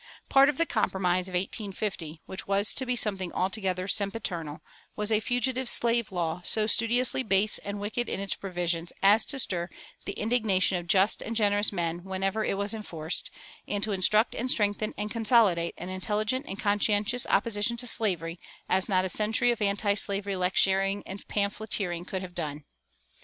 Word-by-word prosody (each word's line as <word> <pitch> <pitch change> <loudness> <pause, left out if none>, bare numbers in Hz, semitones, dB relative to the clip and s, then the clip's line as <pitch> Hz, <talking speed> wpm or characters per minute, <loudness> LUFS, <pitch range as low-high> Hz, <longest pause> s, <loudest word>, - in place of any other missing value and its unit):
Part 275 +1 +6
of 295 - -2
the 335 - +2
Compromise 185 - 0
of 185 - -8
1850, 190 -4 -4
which 190 - -7
was 200 +1 +2
to 260 - +1
be 250 - 0
something 195 -6 0
altogether 185 -1 -1
sempiternal, 190 -7 -1 0.3
was 210 +1 0
a 215 - +3
Fugitive 245 +2 0
Slave 235 -2 +2
Law 175 -1 -3
so 215 +3 +4
studiously 230 +4 +2
base 210 -2 +2
and 200 0 -6
wicked 220 +4 -2
in - - -3
its 200 -1 -1
provisions 175 -3 -2
as 210 +3 +5
to 275 - -1
stir 180 -8 -2 0.4
the - - -4
indignation 210 -5 +1
of 175 - -10
just 195 +2 +3
and 230 - -5
generous 205 -1 +2
men 170 -2 -3
whenever 195 +3 -2
it 195 - -1
was 200 +2 0
enforced, 170 -7 -4 0.4
and 205 -1 -2
to 215 - -1
instruct 210 +4 +3
and 250 +2 -3
strengthen 210 -1 0
and 210 0 -4
consolidate 215 -7 +2
an 180 - -7
intelligent 215 +8 -2
and 195 - -5
conscientious 205 +3 +1
opposition 210 +2 +1
to 245 - 0
slavery 180 -8 0 0.3
as 190 +2 +1
not 185 -1 +2
a - - +1
century 220 +5 +2
of 235 - -4
antislavery 200 -1 0
lecturing 195 +2 +1
and 195 +1 -9
pamphleteering 200 -4 -1
could 190 0 -4
have 180 -1 -9
done. 150 -4 -3
200 Hz, 170 wpm, -27 LUFS, 185-220 Hz, 0.4 s, Part